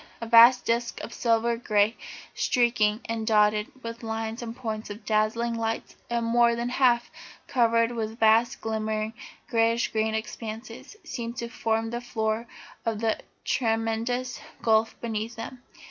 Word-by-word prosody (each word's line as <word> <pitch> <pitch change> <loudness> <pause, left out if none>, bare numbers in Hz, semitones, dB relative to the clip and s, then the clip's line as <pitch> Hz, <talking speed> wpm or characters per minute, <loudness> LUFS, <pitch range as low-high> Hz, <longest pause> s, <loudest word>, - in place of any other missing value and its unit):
A 230 - -5
vast 235 +2 +7
disc 235 +1 0
of 235 - -7
silver 235 0 +2
grey, 215 -1 +2 0.4
streaked 240 -2 +1 0.2
and 225 -1 -3
dotted 210 -1 +3
with 230 0 -6
lines 225 0 -4
and 230 -1 -6
points 220 -3 -5
of 205 +2 -9
dazzling 220 +2 +1
lights, 225 0 -3
and 235 -1 0
more 235 0 +4
than 235 +1 -2
half 245 -2 +2 0.3
covered 230 -2 +2
with 225 -1 -4
vast, 225 +2 +4
glimmering, 220 0 -2 0.3
greyish 230 -2 +2
green 220 0 0
expanses, 225 - -6
seemed 235 -1 -5
to 235 - -4
form 225 -1 -1
the 240 0 -3
floor 220 -1 -2 0.4
of 225 -2 -1
the 225 -1 0 0.3
tremendous 230 +2 -1 0.2
gulf 220 0 +2
beneath 225 0 -3
them. 240 +2 -8
230 Hz, 145 wpm, -27 LUFS, 220-235 Hz, 0.4 s, vast